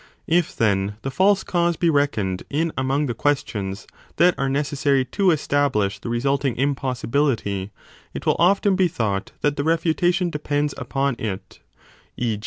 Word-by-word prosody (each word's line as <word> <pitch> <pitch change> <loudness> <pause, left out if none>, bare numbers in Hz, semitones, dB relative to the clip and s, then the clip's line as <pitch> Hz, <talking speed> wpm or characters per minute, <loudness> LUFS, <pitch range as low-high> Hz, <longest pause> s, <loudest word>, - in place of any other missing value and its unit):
If, 170 0 +1
then, 100 -2 +1
the 135 - -3
false 190 +6 +3
cause 170 -1 0
be 170 -2 +2
reckoned 110 -11 0
in 160 +3 0
among 135 +3 0
the 120 - -2
questions 105 -7 -2 0.3
that 180 +1 +5
are 135 -1 -1
necessary 140 -1 +1
to 195 +8 -1
35 180 - +6
establish 115 -10 0
the 115 - -6
resulting 135 +2 0
impossibility, 130 -6 -1 0.4
it - - -7
will - - +3
often 195 +3 +3
be 185 -1 +3
thought 105 - -2
that 145 0 +1
the 145 - 0
refutation 170 +2 +1
depends 145 -1 -1
upon 135 0 -1
it, 100 -4 -5 0.6
e. 115 -4 -1
140 Hz, 155 wpm, -22 LUFS, 115-160 Hz, 0.6 s, 35